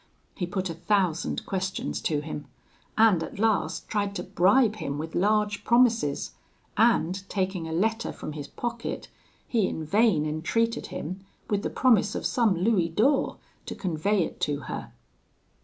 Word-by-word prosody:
He 180 Hz, -, -3 dB
put 190 Hz, +1 st, -2 dB
a 170 Hz, -, -4 dB
thousand 175 Hz, -1 st, 0 dB
questions 190 Hz, 0 st, -3 dB
to 150 Hz, -2 st, 0 dB
him, 150 Hz, -1 st, -6 dB, 0.5 s
and 215 Hz, -6 st, +5 dB
at -, -, -6 dB
last 220 Hz, +1 st, 0 dB
tried 205 Hz, -2 st, -1 dB
to -, -, -3 dB
bribe 200 Hz, +5 st, +3 dB
him 140 Hz, -7 st, -3 dB
with 160 Hz, +2 st, -5 dB
large 210 Hz, +2 st, +1 dB
promises; 230 Hz, -, +2 dB, 0.4 s
and 195 Hz, -5 st, +3 dB
taking 185 Hz, -4 st, -2 dB
a -, -, -5 dB
letter 220 Hz, +7 st, 0 dB
from -, -, -7 dB
his 145 Hz, -2 st, -6 dB
pocket, 235 Hz, 0 st, -5 dB, 0.4 s
he 220 Hz, -6 st, +2 dB
in 160 Hz, -, -4 dB
vain 195 Hz, -3 st, +3 dB
entreated 230 Hz, +10 st, -1 dB
him, 185 Hz, +5 st, -6 dB, 0.3 s
with 205 Hz, -1 st, +2 dB
the -, -, -2 dB
promise 220 Hz, -5 st, +3 dB
of -, -, -3 dB
some 230 Hz, -8 st, +2 dB
louis 180 Hz, -2 st, +2 dB
d'ors, 255 Hz, -, +2 dB, 0.3 s
to -, -, -4 dB
convey 185 Hz, +2 st, 0 dB
it -, -, -6 dB
to 145 Hz, -1 st, -1 dB
her. -, -, -6 dB
195 Hz, 155 wpm, -27 LUFS, 165-220 Hz, 0.5 s, and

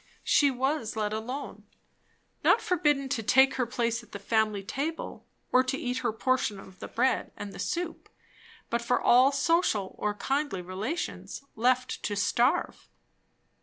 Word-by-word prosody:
She 285 Hz, -, +4 dB
was 265 Hz, -2 st, -1 dB
let 215 Hz, -1 st, -1 dB
alone. 250 Hz, +6 st, -5 dB, 0.8 s
Not -, -, +5 dB
forbidden 295 Hz, -9 st, +1 dB
to 230 Hz, -, -1 dB
take 265 Hz, +5 st, +5 dB
her 250 Hz, -2 st, 0 dB
place 235 Hz, -1 st, -1 dB
at 230 Hz, -, -20 dB
the -, -, -4 dB
family 215 Hz, 0 st, 0 dB
table, 300 Hz, +10 st, -4 dB, 0.2 s
or 255 Hz, -, +5 dB
to 265 Hz, +1 st, -1 dB
eat 250 Hz, -1 st, -2 dB
her 240 Hz, -3 st, 0 dB
portion 240 Hz, -2 st, 0 dB
of 190 Hz, -1 st, -14 dB
the -, -, -6 dB
bread 260 Hz, -, 0 dB
and 205 Hz, -1 st, -7 dB
the -, -, -10 dB
soup; 345 Hz, -1 st, -3 dB, 0.6 s
but 235 Hz, -, +1 dB
for 235 Hz, +1 st, +1 dB
all 255 Hz, +3 st, +5 dB
social 270 Hz, -, +1 dB
or 210 Hz, 0 st, -1 dB
kindly 270 Hz, -6 st, -1 dB
relations, 210 Hz, -, -4 dB
left 255 Hz, +2 st, +1 dB
to 205 Hz, -, -2 dB
starve. 240 Hz, +5 st, +1 dB
250 Hz, 155 wpm, -28 LUFS, 215-275 Hz, 0.8 s, Not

